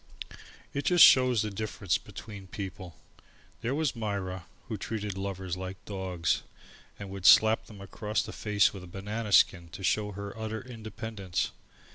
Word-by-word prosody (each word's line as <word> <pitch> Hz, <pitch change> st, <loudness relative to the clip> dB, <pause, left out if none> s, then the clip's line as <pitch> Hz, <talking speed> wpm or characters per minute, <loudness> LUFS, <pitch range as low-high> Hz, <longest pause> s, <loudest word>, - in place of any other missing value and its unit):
It 140 Hz, -1 st, -2 dB
just 175 Hz, +2 st, +9 dB
shows 125 Hz, -4 st, +5 dB
the 105 Hz, -, -3 dB
difference 100 Hz, -3 st, -1 dB
between 100 Hz, -4 st, -10 dB
people. 95 Hz, -3 st, -7 dB, 0.7 s
There 120 Hz, +4 st, -1 dB
was 155 Hz, -4 st, 0 dB
Myra 95 Hz, -5 st, -3 dB, 0.2 s
who -, -, -3 dB
treated 105 Hz, -3 st, -4 dB
lovers 95 Hz, -2 st, -4 dB
like 95 Hz, +1 st, -6 dB
dogs 95 Hz, -4 st, -1 dB, 0.6 s
and 100 Hz, -1 st, -8 dB
would 95 Hz, -1 st, 0 dB
slap 110 Hz, +1 st, +7 dB
them 105 Hz, -2 st, -12 dB
across 105 Hz, +2 st, -2 dB
the -, -, -8 dB
face 105 Hz, -2 st, +2 dB
with 95 Hz, -2 st, -8 dB
a -, -, -10 dB
banana 105 Hz, +4 st, -5 dB
skin 85 Hz, -3 st, +4 dB
to 95 Hz, -, -8 dB
show 105 Hz, +2 st, +1 dB
her 100 Hz, +1 st, -6 dB
utter 110 Hz, 0 st, -4 dB
independence. 110 Hz, -5 st, -4 dB
100 Hz, 155 wpm, -29 LUFS, 95-110 Hz, 0.7 s, just